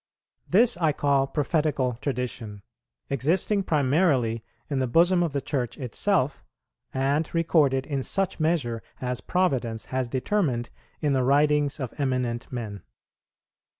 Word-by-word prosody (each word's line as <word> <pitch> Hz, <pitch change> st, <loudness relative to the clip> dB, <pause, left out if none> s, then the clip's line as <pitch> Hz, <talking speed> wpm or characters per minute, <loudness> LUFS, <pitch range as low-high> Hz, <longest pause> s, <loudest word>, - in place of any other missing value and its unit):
This 225 Hz, +3 st, +4 dB
I 160 Hz, -4 st, +2 dB
call 140 Hz, -1 st, +2 dB
Prophetical 145 Hz, -5 st, 0 dB
Tradition, 120 Hz, -7 st, -4 dB, 0.5 s
existing 170 Hz, -, +1 dB
primarily 140 Hz, -, +2 dB, 0.2 s
in 140 Hz, -3 st, -1 dB
the 130 Hz, -, +1 dB
bosom 175 Hz, +7 st, +4 dB
of 170 Hz, -3 st, 0 dB
the 140 Hz, 0 st, -2 dB
Church 125 Hz, -5 st, -2 dB
itself, 140 Hz, -, 0 dB, 0.5 s
and 140 Hz, +4 st, 0 dB
recorded 150 Hz, -5 st, +3 dB
in 140 Hz, -3 st, -2 dB
such 195 Hz, +7 st, -1 dB
measure 150 Hz, -8 st, 0 dB, 0.2 s
as 125 Hz, -1 st, -3 dB
Providence 130 Hz, -11 st, 0 dB
has 130 Hz, -2 st, 0 dB
determined 130 Hz, -, 0 dB, 0.3 s
in 145 Hz, -3 st, +1 dB
the 130 Hz, -, +2 dB
writings 145 Hz, +2 st, +3 dB
of 130 Hz, -4 st, -4 dB
eminent 125 Hz, -4 st, -1 dB
men. 110 Hz, -5 st, -5 dB
140 Hz, 125 wpm, -26 LUFS, 125-160 Hz, 0.5 s, This